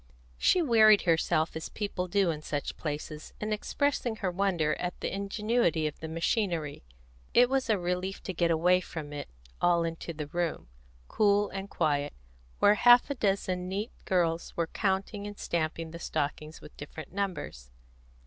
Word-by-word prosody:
She 360 - +4
wearied 220 -6 +6
herself, 160 -2 +1
as 160 - -5
people 200 -3 -3
do 190 -1 +2
in 150 -1 -5
such 145 -1 -3
places, 150 0 -5
in 215 0 -1
expressing 245 +2 -1
her 195 -4 -2
wonder 175 -5 +1
at 180 0 -4
the - - -3
ingenuity 200 -3 0
of 150 - -3
the 160 - -5
machinery; 165 -2 -1 0.5
it 245 +1 +6
was 265 -2 +1
a 215 - +4
relief 180 +2 -3
to 190 - -4
get 170 0 +1
away 175 +3 +4
from 155 -4 -7
it 145 - -6 0.3
all 175 -1 +4
into 165 0 -4
the 155 -2 -5
room, 165 - -3 0.4
cool 205 - +3
and 195 +1 -6
quiet, 145 -5 0 0.4
where 205 - +6
half 245 +5 +6
a - - +2
dozen 195 -6 -1
neat 205 +5 -3
girls 170 -3 0
were 170 - +2
counting 195 +3 -2
and 205 0 -8
stamping 165 -1 -2
the 170 - -8
stockings 155 0 -3
with - - -13
different 145 +2 -9
numbers. 185 - -4
180 Hz, 165 wpm, -29 LUFS, 160-205 Hz, 0.5 s, wearied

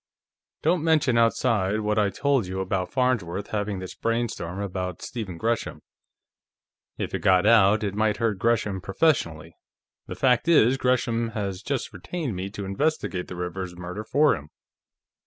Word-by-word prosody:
"Don't 165 0 +2
mention 155 -6 +3
outside 115 -3 +2
what 105 0 +1
I 105 -1 +3
told 135 -2 +1
you 95 +1 -4
about 95 -1 -2
Farnsworth 105 -8 0
having 105 -1 -2
this 95 0 -7
brainstorm 115 -6 -2
about 90 -3 -4
Stephen 105 -8 -5
Gresham. 115 +4 -2 1.1
If - - -4
it - - -1
got 95 0 +4
out, 110 -1 +5
it 100 -2 -1
might 105 0 +1
hurt 110 -4 0
Gresham 105 -3 +1
professionally. 85 - 0 0.5
The - - -6
fact 125 +2 +2
is, 135 -6 +5
Gresham 120 -3 0
has 100 -2 -3
just 135 -1 -3
retained 130 - -4
me 95 +2 -4
to 100 -1 -6
investigate 100 - -1
the 90 - -7
Rivers 90 +1 -5
murder 90 +4 -6
for 145 +6 +3
him. 75 0 -10
105 Hz, 155 wpm, -25 LUFS, 95-120 Hz, 1.1 s, out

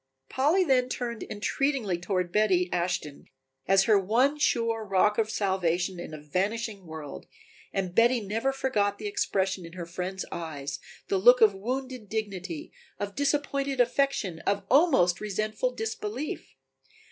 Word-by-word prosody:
Polly 305 +9 +3
then 255 -5 +2
turned 235 -3 -4
entreatingly 215 -2 -1
toward 180 -1 -1
Betty 185 -3 +2
Ashton 175 -5 -2 0.4
as 195 0 +5
her 210 0 +4
one 250 +10 +2
sure 230 -5 +1
rock 210 +1 +2
of 220 -1 +1
salvation 185 -3 0
in 175 - -7
a 155 - -6
vanishing 195 +5 -2
world, 155 -3 -8 0.4
and 185 -2 -2
Betty 240 +4 +4
never 225 +5 -1
forgot 210 -7 0
the 210 - -8
expression 195 -2 -1
in 165 0 -10
her 175 -1 -6
friend's 180 +2 -4
eyes, 150 -4 -5 0.3
the 195 - +1
look 245 +5 +7
of 215 -2 +6
wounded 250 +2 -4
dignity, 195 -6 -4 0.3
of 205 0 -3
disappointed 280 -1 0
affection, 245 -8 +1
of 200 +3 -1
almost 260 - +4
resentful 215 +3 -1
disbelief. 225 +3 -5
205 Hz, 140 wpm, -28 LUFS, 185-245 Hz, 0.4 s, look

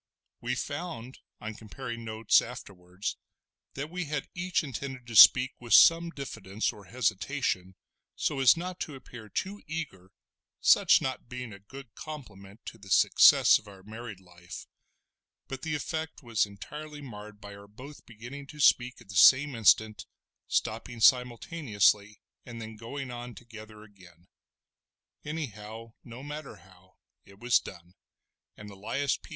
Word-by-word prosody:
We 120 +2 -2
found, 145 -3 -6 0.2
on 110 +1 -6
comparing 115 +2 -8
notes 110 -1 +3
afterwards, 90 +1 -7 0.6
that 145 +3 -5
we 180 -1 -3
had 150 -2 -4
each 180 0 -1
intended 130 -2 -6
to 120 -1 -8
speak 125 +4 +9
with 120 -1 +3
some 165 0 +6
diffidence 110 - -4
or 100 -2 -14
hesitation 105 -3 -2 0.4
so 145 - -1
as 135 +4 +6
not 180 +1 -5
to 150 - -5
appear 120 -4 -12
too 200 - -4
eager, 145 - -6 0.5
such - - +5
not 130 -2 -4
being 125 -3 -7
a 100 - -12
good 125 +3 -13
compliment 105 -9 -10
to 115 - -9
the 100 -1 -14
success - - +6
of 110 - -20
our 95 -2 -14
married 110 -1 -9
life; 90 -1 -11 0.8
but 135 -1 -6
the 155 0 -2
effect 160 +1 -5
was 115 -4 +1
entirely 150 +10 -9
marred 105 -4 -10
by 100 -1 -10
our 100 0 -13
both 130 +8 -12
beginning 125 +5 -10
to 150 +1 -12
speak 125 -3 +3
at 120 - -17
the 95 - -10
same 135 +9 +6
instant—stopping 110 0 -1
simultaneously 115 - +2 0.2
and 120 -2 -9
then 110 0 -8
going 125 +4 -7
on 120 0 -8
together 110 -2 -12
again. 90 -4 -19 1.0
Anyhow, 115 -7 -7
no 120 +2 -10
matter 150 0 -7
how, 95 +1 -22 0.3
it 100 - -18
was 120 +3 +3
done; 85 +1 -12 0.6
and 105 - -10
Elias 115 +8 -2
P. - - -17
115 Hz, 145 wpm, -29 LUFS, 105-140 Hz, 1.0 s, speak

